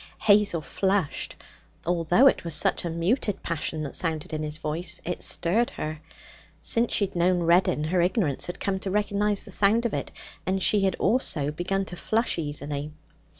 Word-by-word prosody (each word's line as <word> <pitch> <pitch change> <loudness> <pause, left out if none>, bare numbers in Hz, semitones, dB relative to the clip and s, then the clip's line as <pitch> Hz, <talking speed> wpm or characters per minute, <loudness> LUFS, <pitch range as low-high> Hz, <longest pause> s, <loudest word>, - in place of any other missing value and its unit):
Hazel 205 -5 +4
flushed. 190 0 -1 0.5
Although 175 - +3
it 275 - +4
was 170 -3 -1
such - - +2
a 170 - -2
muted 185 +6 -1
passion 155 -1 -3
that 140 - -5
sounded 160 -3 -1
in 155 - -2
his 150 0 -3
voice, 160 +3 -2
it 180 - -3
stirred 215 +8 +1
her. 155 0 -4 0.6
Since 235 +1 +1
she 205 - +2
had 195 - -11
known 175 0 +2
Reddin, 170 -2 +3
her 175 +3 +1
ignorance 175 - 0
had 175 - -6
come 190 -1 -1
to 190 - -4
recognize 205 0 0
the 205 - -9
sound 210 +5 +3
of 235 - -1
it, - - -3 0.3
and 190 +1 -1
she 210 - +5
had 190 - +1
also 170 - +1
begun 190 +5 -2
to 180 - -6
flush 220 +1 0
easily. 145 -1 -4
175 Hz, 180 wpm, -26 LUFS, 155-200 Hz, 0.6 s, she